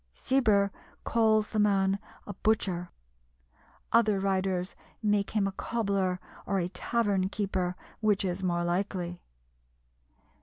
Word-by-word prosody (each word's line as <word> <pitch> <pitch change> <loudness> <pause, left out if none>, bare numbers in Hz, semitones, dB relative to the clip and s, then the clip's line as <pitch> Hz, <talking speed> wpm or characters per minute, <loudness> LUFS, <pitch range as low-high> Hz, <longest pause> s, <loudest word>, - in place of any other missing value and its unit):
Cibber 210 -7 +3 0.3
calls 220 -2 +2
the 215 - 0
man 195 -1 +3 0.3
a 205 - -6
butcher; 185 -4 0 1.0
other 220 -4 +4
writers 190 -1 0 0.3
make 205 -1 +2
him 210 -2 +1
a 195 - 0
cobbler 195 -4 -1 0.3
or 195 - +1
a 175 -1 0
tavern 195 0 0
keeper, 185 -3 -1 0.2
which 210 -2 +2
is 180 0 -2
more 175 -2 0
likely. 175 0 -2
195 Hz, 115 wpm, -29 LUFS, 185-210 Hz, 1.0 s, other